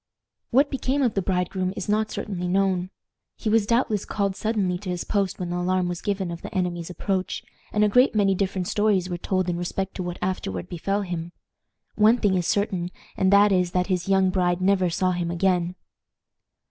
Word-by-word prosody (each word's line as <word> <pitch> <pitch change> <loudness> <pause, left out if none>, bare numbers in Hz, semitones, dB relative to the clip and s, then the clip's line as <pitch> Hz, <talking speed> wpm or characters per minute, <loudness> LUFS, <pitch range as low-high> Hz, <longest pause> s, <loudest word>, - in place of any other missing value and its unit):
What 275 +4 +3
became 270 +1 0
of 240 - +2
the 195 - 0
bridegroom 185 0 -1
is - - -4
not 215 +1 +1
certainly 180 -4 -4
known. 185 -1 +1 0.5
He 220 - -3
was 220 -2 +3
doubtless 230 -3 +1
called 200 -2 -1
suddenly 200 -5 -1
to 195 -1 -7
his 180 -1 -2
post 200 -3 -1
when 175 -1 -4
the 175 - -1
alarm 185 0 +1
was 175 -1 -4
given 195 -3 -2
of 170 - -7
the - - -7
enemy's 175 -2 -1
approach, 185 +1 -2 0.3
and 210 - +2
a - - +5
great 250 +3 +4
many 200 -2 +3
different 190 -1 -1
stories 200 -4 +1
were 175 - -3
told 185 0 0
in 175 -1 -1
respect 190 +2 -3
to - - -3
what 175 -1 -4
afterward 95 - -3
befell 195 +4 -1
him. 175 -2 -5 0.6
One 215 +3 +5
thing 205 -5 +2
is 180 -2 0
certain, 200 -4 0 0.3
and 190 0 +2
that 200 +1 +6
is, 180 -2 +1
that 180 0 +1
his 180 +1 -2
young 190 -1 +4
bride 180 -1 +1
never 185 -1 +2
saw 185 +2 +1
him 175 -1 -2
again. 180 0 +1
185 Hz, 200 wpm, -25 LUFS, 180-205 Hz, 0.6 s, that